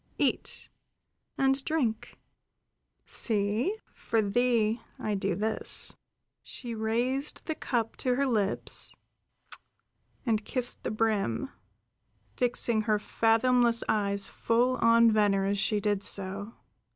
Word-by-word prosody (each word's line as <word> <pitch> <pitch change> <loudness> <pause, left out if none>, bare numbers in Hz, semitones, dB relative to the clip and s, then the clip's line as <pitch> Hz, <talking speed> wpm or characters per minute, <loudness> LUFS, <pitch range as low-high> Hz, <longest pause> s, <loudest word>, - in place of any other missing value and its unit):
Eat - - -1 0.7
and 270 0 +2
drink. 260 -9 -2 0.9
See, 220 - -1 0.2
for 225 - -2
thee 225 +1 +1 0.2
I 215 - -3
do 195 0 -1
this." 220 +2 0 0.5
She 240 -2 -8
raised 240 +6 -1
the 320 - -2
cup 235 -6 -3
to 250 -1 0
her 280 +2 +1
lips, 215 -6 +2 1.3
and 220 -3 0
kissed 245 +1 0
the - - -3
brim, 215 - -1 0.8
fixing 240 -2 +1
her 215 - +3
fathomless 230 +2 +2
eyes 200 -2 +2
full 245 +3 0
on 230 0 +5
Venner 205 -2 +2
as 200 0 -1
she 210 +1 +1
did 205 -1 -1
so. 200 +2 +1
225 Hz, 110 wpm, -28 LUFS, 205-245 Hz, 1.3 s, on